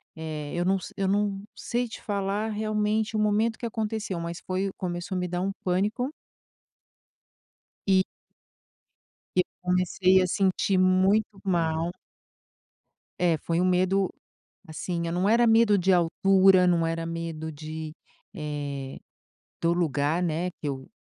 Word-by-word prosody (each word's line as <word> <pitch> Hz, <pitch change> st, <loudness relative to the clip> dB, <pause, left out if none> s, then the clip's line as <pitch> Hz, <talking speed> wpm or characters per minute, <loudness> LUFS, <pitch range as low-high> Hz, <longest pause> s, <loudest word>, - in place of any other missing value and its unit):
eh 155 Hz, -2 st, -5 dB
eu 175 Hz, 0 st, 0 dB
não 190 Hz, +1 st, +2 dB
se -, -, -9 dB
eu 195 Hz, -1 st, 0 dB
não 200 Hz, 0 st, 0 dB
sei 245 Hz, +1 st, -2 dB
te 230 Hz, -, -9 dB
falar 200 Hz, +1 st, -1 dB
realmente 215 Hz, 0 st, 0 dB
o -, -, +1 dB
momento 215 Hz, +2 st, +1 dB
que -, -, -4 dB
aconteceu, 220 Hz, -4 st, -3 dB
mas 170 Hz, +1 st, -5 dB
foi 190 Hz, +1 st, -1 dB
começou 175 Hz, +1 st, -4 dB
a -, -, 0 dB
me 180 Hz, -, -1 dB
dar 175 Hz, 0 st, -2 dB
um 195 Hz, +1 st, 0 dB
pânico 205 Hz, +8 st, 0 dB, 1.8 s
e 190 Hz, -1 st, +5 dB, 1.3 s
e -, -, +4 dB
eu -, -, +5 dB, 0.2 s
comecei 185 Hz, +1 st, +3 dB
a 185 Hz, -, +1 dB
sentir 190 Hz, +1 st, +1 dB
muito 190 Hz, +3 st, +3 dB
mal. 170 Hz, -3 st, 0 dB, 1.3 s
É, 170 Hz, -2 st, +3 dB
foi 165 Hz, +3 st, -1 dB
um -, -, +2 dB
medo, 185 Hz, +1 st, +2 dB, 0.6 s
assim, 170 Hz, +2 st, -3 dB
eh, -, -, -2 dB
não 180 Hz, +3 st, +1 dB
era 235 Hz, +2 st, +4 dB
medo 225 Hz, -2 st, +5 dB
de 190 Hz, +1 st, +2 dB
altura, 185 Hz, +1 st, +5 dB
não 170 Hz, -2 st, +3 dB
era 165 Hz, 0 st, -2 dB
medo 165 Hz, -1 st, -4 dB
de, 155 Hz, +1 st, -7 dB, 0.4 s
eh, 145 Hz, -4 st, -5 dB, 0.6 s
do 170 Hz, 0 st, +3 dB
lugar, 160 Hz, -1 st, +1 dB
né, 175 Hz, +1 st, 0 dB
que 150 Hz, -, -4 dB
eu 135 Hz, -2 st, -4 dB
185 Hz, 145 wpm, -27 LUFS, 165-200 Hz, 1.8 s, e